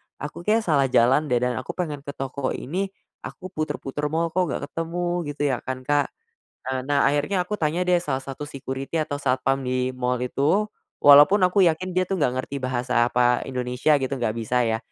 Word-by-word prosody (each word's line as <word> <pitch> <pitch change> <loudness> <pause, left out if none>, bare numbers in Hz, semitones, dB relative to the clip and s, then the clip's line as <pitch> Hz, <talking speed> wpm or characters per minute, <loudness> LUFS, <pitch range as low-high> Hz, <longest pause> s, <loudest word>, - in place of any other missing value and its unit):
aku 145 +4 -7
kayaknya 220 +1 +3
salah 140 -5 +2
jalan 130 +5 +3
deh, 125 - +1
dan 125 0 0
aku 130 - -6
pengen 155 -6 -3
ke 140 0 -8
toko 135 0 -3
ini, 185 +8 -3 0.3
aku 185 0 -9
puter-puter 150 -3 -3
mall, 165 +2 -1
kok 180 0 +1
nggak 145 - -4
ketemu 175 0 -2
gitu, - - -7
ya 125 - -1
kan, 130 0 -6
Kak. 145 +1 +2 0.6
Eee, 130 0 -3
nah, 145 -1 +2
akhirnya 150 +6 0
aku 210 +3 -4
tanya 160 +3 0
deh 180 -1 +3
salah 135 -6 -3
satu 140 +2 -7
security 135 +3 -4
atau 145 -1 -4
satpam 135 0 +1
di 130 0 0
mall 125 0 -1
itu, 145 +10 +1 0.4
walaupun 145 +8 +8
aku 185 +2 +3
yakin 170 +3 0
dia 185 0 0
tuh 195 - -1
nggak 130 -1 +1
ngerti 135 +1 -5
bahasa 125 -1 0
apa, 125 0 +2
Indonesia 125 +4 +1
gitu, 135 0 -2
nggak 120 -4 -2
bisa 120 +2 +1
ya. 110 -1 0
140 Hz, 195 wpm, -24 LUFS, 130-165 Hz, 0.6 s, walaupun